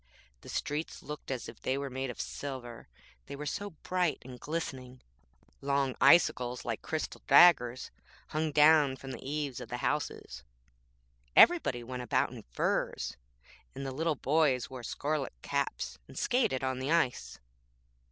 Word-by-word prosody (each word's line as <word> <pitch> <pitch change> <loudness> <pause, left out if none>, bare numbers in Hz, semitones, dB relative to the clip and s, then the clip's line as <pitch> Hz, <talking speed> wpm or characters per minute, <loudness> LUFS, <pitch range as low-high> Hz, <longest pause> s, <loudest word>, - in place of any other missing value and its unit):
The - - -12
streets 150 +2 -3
looked 150 0 -8
as 130 -3 -3
if 115 - -11
they 130 - 0
were 140 -1 -4
made 130 +1 -3
of 120 - -7
silver, 130 -4 -6 0.4
they - - -6
were 150 +1 -6
so 205 +7 -3
bright 180 -5 0
and 125 -1 -10
glistening; 130 -5 -5 0.6
long 140 -2 0
icicles 125 -7 +4
like 115 -2 -3
crystal 160 -1 -4
daggers 130 -8 +6 0.4
hung 155 0 -1
down 150 -2 +5
from 135 0 -9
the - - -8
eaves 145 -2 -3
of - - -8
the 125 - -3
houses, 125 - -3 0.9
everybody 225 - +6
went 125 +1 -5
about 125 - +1
in - - -9
furs, - - -2 0.6
and 135 +1 -5
the 135 - -3
little 160 +3 0
boys 140 -3 +1
wore 130 -1 -7
scarlet 145 - -2
caps - - -2
and - - -13
skated 230 - +1
on 130 -1 -1
the 130 +2 -3
ice. 125 - 0
135 Hz, 150 wpm, -31 LUFS, 125-150 Hz, 0.9 s, daggers